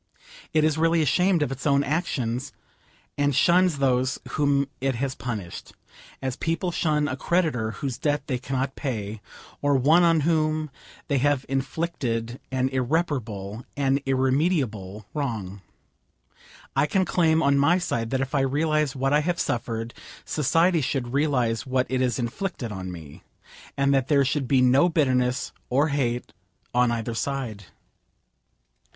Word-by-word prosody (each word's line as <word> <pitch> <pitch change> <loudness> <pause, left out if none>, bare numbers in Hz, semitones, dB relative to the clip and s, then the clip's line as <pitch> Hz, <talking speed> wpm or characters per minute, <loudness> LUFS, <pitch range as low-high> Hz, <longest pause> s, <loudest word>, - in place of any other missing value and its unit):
It 155 -1 +3
is 155 0 +2
really 165 0 +3
ashamed 175 +4 +3
of 135 - -2
its 135 +2 -4
own 140 0 +3
actions, 135 -5 -2 0.7
and 145 -1 +2
shuns 175 +2 +4
those 130 -1 +1
whom 140 -2 +1
it 135 -1 0
has 130 +2 -2
punished, 110 -10 -6 0.5
as 130 -2 -2
people 165 +2 -1
shun 150 -3 +1
a 130 - -2
creditor 150 -7 0
whose 130 +1 -4
debt 145 -1 0
they 130 -4 -2
cannot 135 +1 -2
pay, 110 -5 -4 0.4
or 145 -1 +2
one 150 +7 +5
on 165 -2 +4
whom 155 -1 +1 0.4
they 140 -2 +1
have 145 0 +1
inflicted 135 -4 -2
an 130 0 +1
irreparable, 125 - -2
an 135 -1 +2
irremediable 130 - 0
wrong. 110 -10 -4 1.1
I 140 +2 +3
can 190 +5 +1
claim 160 -3 +2
on 140 0 +3
my 160 +6 +4
side 115 -10 -2
that 130 +1 0
if 135 +1 -3
I 145 - +2
realise 150 +1 +1
what 135 +1 0
I 150 - +5
have 170 +3 -1
suffered, 115 0 -2 0.3
society 165 +3 +2
should 130 -2 -2
realise 130 -5 +1
what 130 0 +1
it 130 0 +1
has 125 -1 +1
inflicted 125 - -3
on 95 -2 -5
me; 80 -5 -10 0.6
and 140 0 +3
that 135 -2 +2
there 140 -2 +4
should 135 0 -1
be 130 -1 +3
no 135 +7 +5
bitterness 130 -6 +1 0.2
or 140 +5 +2
hate 125 - -1 0.4
on 125 0 +3
either 115 0 -2
side. 115 -5 -3
135 Hz, 150 wpm, -25 LUFS, 125-150 Hz, 1.1 s, one